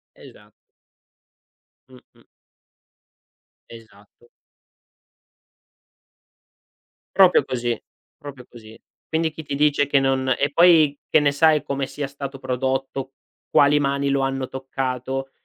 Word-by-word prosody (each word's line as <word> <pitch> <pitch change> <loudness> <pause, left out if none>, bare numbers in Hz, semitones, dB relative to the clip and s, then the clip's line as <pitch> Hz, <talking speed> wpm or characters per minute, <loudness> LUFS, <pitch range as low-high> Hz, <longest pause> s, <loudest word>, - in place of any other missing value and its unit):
Esa - - -17 1.4
Mh-mh. 130 -1 -21 1.4
Esatto. 110 0 -17 2.9
Proprio 190 -2 +5
così, 120 -2 -3 0.4
proprio 140 -5 -11
così. 110 -2 -15 0.3
Quindi 160 0 -1
chi 160 +1 -10
ti 145 -1 -6
dice 145 0 +2
che 140 0 +2
non 130 -1 0
e 140 - 0
poi 160 -3 +5
che - - +4
ne 145 -1 +2
sai 155 +1 +3
come 140 -1 -3
sia 145 +1 -5
stato 140 0 -8
prodotto, 130 +1 -3 0.4
quali 145 -1 +4
mani 140 0 -1
lo 140 0 +1
hanno 135 -1 -2
toccato, 130 0 -4
135 Hz, 105 wpm, -22 LUFS, 130-145 Hz, 2.9 s, Proprio